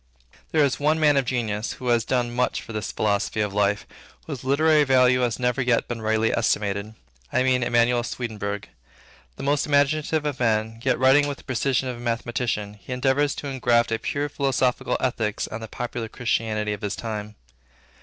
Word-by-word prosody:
There 155 -2 +4
is 135 - -1
one 155 +2 +2
man 150 -2 +4
of 135 -2 +2
genius, 115 -3 -2
who 125 -1 -5
has 120 -1 +3
done 120 -1 -1
much 125 +1 0
for 115 - -9
this 105 -2 -3
philosophy 105 +1 0
of 105 -2 0
life, 100 0 +1 0.4
whose 140 -6 -6
literary 150 +3 +4
value 125 -2 +4
has 120 -3 0
never 125 +1 0
yet 125 -2 +1
been 120 -2 -5
rightly 110 +1 +1
estimated; 105 -1 -1 0.4
I 130 - +2
mean 130 -1 +2
Emanuel 120 0 +3
Swedenborg. 105 -4 -4 0.7
The - - -8
most 145 +2 +1
imaginative 150 +1 +2
of 145 -3 -2
men, 110 -1 0
yet 130 - +2
writing 135 +3 +5
with 140 -1 -4
the - - -16
precision 130 0 0
of 125 -1 -4
a - - -11
mathematician, 115 -3 -2
he - - -10
endeavored 135 +3 +2
to 145 - -5
engraft 120 -3 +2
a 115 - 0
purely 145 +5 -2
philosophical 135 -3 0
Ethics 110 -5 -1
on 110 - -6
the 110 - -6
popular 120 0 -5
Christianity 110 -3 -1
of 105 - -7
his 105 -1 -2
time. 105 -2 -5
120 Hz, 185 wpm, -24 LUFS, 110-135 Hz, 0.7 s, writing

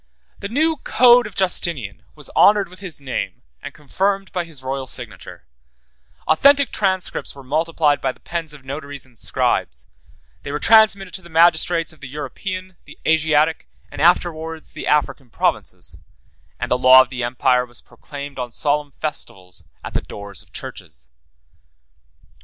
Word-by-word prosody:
The 200 - -4
new 315 +6 +1
Code 245 -3 +5
of 205 - -12
Justinian 165 - 0
was 150 -3 -8
honored 205 -3 +5
with 180 0 -13
his 185 -7 -5
name, 135 - -4 0.2
and - - -7
confirmed 195 +6 -2
by 180 -2 -2
his 150 -6 -11
royal 135 0 -3
signature: 115 - -7 0.8
authentic 280 - +5
transcripts 190 -6 -2
were 140 - -11
multiplied 155 +1 +1
by 135 - 0
the - - -21
pens 170 -3 -5
of 145 -3 -13
notaries 140 0 -7
and 130 -2 -23
scribes; - - -2 0.5
they 140 - -6
were 145 - -1
transmitted 205 -1 +4
to 190 - -8
the 170 - -15
magistrates 165 0 +3
of 155 - -20
the 140 - -9
European, 185 +6 -6
the - - -14
Asiatic, 160 0 +2 0.2
and 145 - -6
afterwards 165 -1 +1
the - - -6
African 145 -3 0
provinces; 90 -6 -2 0.6
and - - -4
the - - +2
law 130 +1 +9
of 130 - -15
the 125 -2 -3
empire 125 +1 +2
was 120 -1 -10
proclaimed 140 -2 -10
on 125 -1 -4
solemn 145 +3 0
festivals 95 - -5 0.2
at - - -7
the - - 0
doors 100 -1 -8
of - - -21
churches. 65 -1 -9
150 Hz, 160 wpm, -20 LUFS, 130-180 Hz, 0.8 s, law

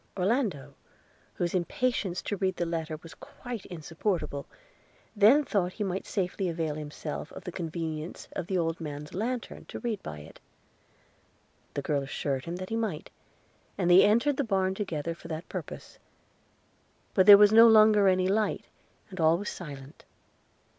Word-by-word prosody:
Orlando, 185 - -1 0.6
whose 175 -1 -2
impatience 190 0 -1
to 205 - -2
read 190 -1 -1
the 175 - -1
letter 160 -2 -3
was 165 - -11
quite 245 -5 -9
insupportable, 165 -2 -3 0.7
then 225 +8 +6
thought 185 -8 -1
he 215 - -3
might 190 -1 -3
safely 190 -1 -2
avail 165 -2 -2
himself 150 +1 -6
of - - -9
the 180 - -6
convenience 165 -2 -5
of 175 - -5
the 190 -2 0
old 165 -1 -1
man's 150 -1 -7
lantern 235 +5 -4
to - - -8
read 230 -5 -3
by 75 - -7
it. 75 - -14 1.4
The 140 - -2
girl 145 -1 0
assured 135 -1 -3
him 170 +1 -4
he 225 - -3
might, 215 -9 -3 0.7
and 175 - +2
they 180 - +8
entered 235 +7 +3
the 285 - +1
barn 190 -4 0
together 170 -5 -3
for 170 - -13
that 160 +1 -6
purpose; - - -8 1.1
but 190 0 +3
there 205 -1 +12
was 205 0 +6
no 230 +1 +9
longer 215 -2 +6
any 185 -1 +3
light, 210 +2 0 0.5
and 185 - -8
all 160 +1 +4
was 205 +3 -4
silent. 140 -5 -9
180 Hz, 160 wpm, -28 LUFS, 160-210 Hz, 1.4 s, there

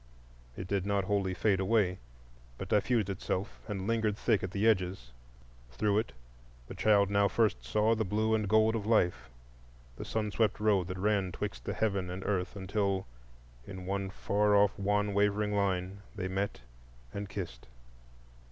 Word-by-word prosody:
It 95 - -5
did 100 0 -1
not 100 0 0
wholly 95 -1 0
fade 100 0 +2
away, 95 -2 +2 0.6
but - - -6
diffused 105 0 +2
itself 100 +1 -3
and 100 -3 -4
lingered 110 -2 0
thick 110 -4 +2
at 95 - -3
the 100 +4 0
edges. 90 - 0 0.6
Through 100 - +1
it 110 - -4 0.5
the - - -9
child 100 -2 +3
now 100 0 +4
first 100 - +1
saw 105 - +2
the 110 -1 0
blue 110 +3 0
and 105 -3 0
gold 110 +1 +4
of 105 -2 -3
life,—the - - -3
sun 110 -2 -2
swept 110 -1 +1
road 100 -4 +2
that 90 0 -5
ran 100 -1 +1
'twixt 95 -14 -5
heaven 100 -4 -1
and 90 +2 -5
earth 95 -1 -1
until 100 0 -1 0.6
in 95 -2 -8
one 100 0 -2
far 105 +1 +1
off 100 -1 +5
wan 105 +1 +1
wavering 105 +1 +1
line 95 -1 -1
they 95 -3 -3
met 95 -2 -2 0.5
and 100 -1 -5
kissed. 65 -14 -6
100 Hz, 160 wpm, -31 LUFS, 95-105 Hz, 0.6 s, off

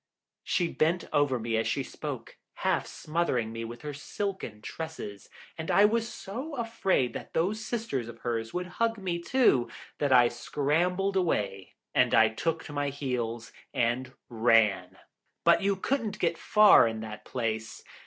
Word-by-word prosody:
She 175 - +1
bent 165 +2 +1
over 145 -3 +3
me 115 0 -2
as 110 0 0
she 135 +5 0
spoke, - - -7 0.3
half - - +1
smothering 140 -9 -1
me 115 0 -4
with 120 +1 -8
her 150 -1 -4
silken 145 - -5
tresses, 160 -11 -7 0.3
and 160 - -4
I 200 - +6
was 230 +2 +2
so 260 +12 -6
afraid 225 - 0
that - - -8
those 205 +6 0
sisters 215 - -3
of 120 - -9
hers 115 -2 -2
would 180 0 -2 0.2
hug 230 -1 +2
me 180 -4 -2
too, 170 - +3 0.3
that 145 -2 +1
I 125 -2 +7
scrambled 170 +10 0
away 100 - -1 0.2
and - - +4
I 110 -1 +6
took 165 +9 -2
to 145 - -9
my 145 -1 0
heels 125 -5 -3 0.2
and 120 +2 0 0.2
ran. 110 -6 +2 0.5
But - - +5
you 200 0 +2
couldn't 215 0 -1
get 170 -4 +1
far 210 - +6
in 110 -1 -4
that 110 -1 -7
place. 110 -3 -3
145 Hz, 160 wpm, -29 LUFS, 115-190 Hz, 0.5 s, I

